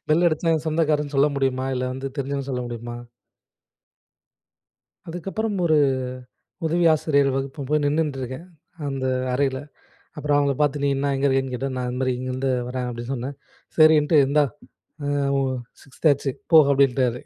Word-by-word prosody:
Bell 160 Hz, +3 st, +3 dB
அடிச்சா 165 Hz, +1 st, 0 dB
"என் 155 Hz, -1 st, -2 dB
சொந்தக்காருன்னு" 150 Hz, -2 st, 0 dB
சொல்ல 140 Hz, +2 st, +5 dB
முடியுமா? 135 Hz, -1 st, 0 dB
இல்ல 125 Hz, 0 st, -1 dB
வந்து 135 Hz, +1 st, -5 dB
தெரிஞ்சவன் 140 Hz, 0 st, -3 dB
சொல்ல 125 Hz, -1 st, -2 dB
முடியுமா? 120 Hz, 0 st, -6 dB, 2.1 s
அதுக்கப்புறம் 195 Hz, +6 st, -3 dB
ஒரு 155 Hz, -2 st, +4 dB, 0.9 s
உதவி 170 Hz, +2 st, +2 dB
ஆசிரியர் 145 Hz, -3 st, +2 dB
வகுப்ப 135 Hz, +1 st, -4 dB
போய் 150 Hz, 0 st, +2 dB
நின்னுட்டுருக்கேன். 145 Hz, 0 st, -2 dB, 0.4 s
அந்த 135 Hz, -1 st, -3 dB, 0.3 s
அறையில. 130 Hz, 0 st, 0 dB, 0.6 s
அப்புறம் 150 Hz, -1 st, 0 dB
அவங்கள 140 Hz, -1 st, +2 dB
பார்த்து 145 Hz, -1 st, +1 dB
நீ 140 Hz, -, +3 dB
என்ன 140 Hz, +1 st, 0 dB
எங்க 135 Hz, +1 st, 0 dB
இருக்கேன்னு 135 Hz, -1 st, 0 dB
கேட்டேன். 130 Hz, +1 st, -3 dB
"நான் 125 Hz, -1 st, -2 dB
இந் 125 Hz, -, -4 dB
மாரி 130 Hz, -1 st, +1 dB
இங்கேருந்து 130 Hz, +1 st, -2 dB, 0.2 s
வர்றேன்" 125 Hz, 0 st, -3 dB
அப்டின்னு 120 Hz, +1 st, -6 dB
சொன்னே. 125 Hz, 0 st, -4 dB, 0.5 s
"சரின்ட்டு 155 Hz, 0 st, +6 dB
இந்தா 145 Hz, +2 st, +3 dB, 0.6 s
ஆ -, -, -1 dB, 0.3 s
ஒ -, -, +2 dB, 0.4 s
சிக்ஸ்த் 135 Hz, +4 st, -2 dB
ஆச்சு 140 Hz, -1 st, -1 dB, 0.2 s
போ" 165 Hz, -, +9 dB
அப்டின்ட்டாரு. 130 Hz, -3 st, +2 dB
140 Hz, 150 wpm, -23 LUFS, 130-150 Hz, 2.1 s, போ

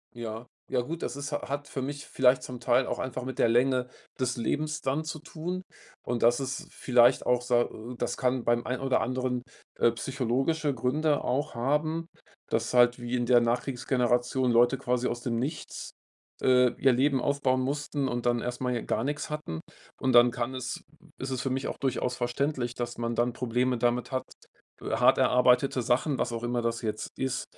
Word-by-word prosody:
Ja. 115 Hz, 0 st, -6 dB, 0.2 s
Ja, 125 Hz, -1 st, +1 dB
gut, 165 Hz, +6 st, -6 dB
das -, -, -3 dB
ist 140 Hz, +1 st, -5 dB
ha 145 Hz, -, -3 dB
hat 145 Hz, +1 st, -3 dB
für 135 Hz, -, -4 dB
mich 145 Hz, +2 st, -5 dB
vielleicht 125 Hz, 0 st, +3 dB
zum 125 Hz, -1 st, -7 dB
Teil 125 Hz, +1 st, +3 dB
auch -, -, -3 dB
einfach 130 Hz, -1 st, -4 dB
mit 130 Hz, -, -5 dB
der -, -, +5 dB
Länge 125 Hz, +1 st, +2 dB, 0.3 s
des 125 Hz, -1 st, 0 dB
Lebens 150 Hz, +6 st, -1 dB
dann 135 Hz, +4 st, 0 dB
zu 155 Hz, 0 st, -5 dB
tun. 170 Hz, +4 st, -5 dB, 0.4 s
Und 120 Hz, -1 st, -2 dB
das 120 Hz, +1 st, +5 dB
ist 135 Hz, -1 st, -4 dB
vielleicht 125 Hz, 0 st, +4 dB
auch, 125 Hz, 0 st, +2 dB
sa 120 Hz, -1 st, +3 dB
äh, 120 Hz, +2 st, -7 dB
das -, -, -2 dB
kann 125 Hz, -1 st, 0 dB
beim 120 Hz, 0 st, +2 dB
ein 125 Hz, 0 st, -1 dB
oder 135 Hz, -1 st, +1 dB
anderen, 125 Hz, -1 st, -1 dB, 0.4 s
äh, 120 Hz, -, +5 dB
psychologische 135 Hz, +5 st, -1 dB
Gründe 145 Hz, +5 st, 0 dB
auch 145 Hz, +4 st, -1 dB
haben, 155 Hz, +6 st, 0 dB, 0.4 s
dass 115 Hz, +1 st, 0 dB
halt 120 Hz, 0 st, +5 dB
wie 120 Hz, +1 st, -4 dB
in 120 Hz, -1 st, 0 dB
der 120 Hz, 0 st, +6 dB
Nachkriegsgeneration 125 Hz, +1 st, +1 dB
Leute 120 Hz, +3 st, +4 dB
quasi 125 Hz, -1 st, 0 dB
aus 120 Hz, 0 st, -4 dB
dem 120 Hz, -2 st, -1 dB
Nichts, 150 Hz, +5 st, -5 dB, 0.5 s
äh, 125 Hz, -1 st, +5 dB
ihr 135 Hz, -1 st, +5 dB
Leben 135 Hz, +1 st, +2 dB
aufbauen 135 Hz, -2 st, +1 dB
mussten 145 Hz, +1 st, -1 dB
und 120 Hz, 0 st, -3 dB
dann 120 Hz, -1 st, +2 dB
erst 125 Hz, +1 st, -4 dB
mal 125 Hz, -1 st, 0 dB
hier 120 Hz, -, -1 dB
gar -, -, -1 dB
nix 145 Hz, +2 st, -2 dB
hatten. 150 Hz, -, -5 dB, 0.4 s
Und 130 Hz, -1 st, +1 dB
dann 120 Hz, 0 st, +7 dB
kann 125 Hz, +1 st, -3 dB
es 125 Hz, -1 st, -4 dB, 0.4 s
ist 135 Hz, -, -4 dB
es 130 Hz, -2 st, -2 dB
für 135 Hz, -, -1 dB
mich 135 Hz, +1 st, -1 dB
auch -, -, -4 dB
durchaus 125 Hz, -2 st, -1 dB
verständlich, 125 Hz, 0 st, -1 dB
dass 120 Hz, -1 st, -4 dB
man 115 Hz, 0 st, -2 dB
dann 120 Hz, +1 st, +1 dB
Probleme 125 Hz, +1 st, 0 dB
damit 120 Hz, +3 st, 0 dB
hat, 130 Hz, -, -1 dB, 0.6 s
hart -, -, +3 dB
erarbeitete 125 Hz, +1 st, +4 dB
Sachen, 130 Hz, +4 st, +1 dB
was 120 Hz, -, -1 dB
auch 115 Hz, +1 st, -4 dB
immer 120 Hz, 0 st, 0 dB
das 115 Hz, 0 st, -1 dB
jetzt 110 Hz, -1 st, -3 dB
ist, 130 Hz, -1 st, -1 dB
125 Hz, 195 wpm, -28 LUFS, 120-135 Hz, 0.6 s, dann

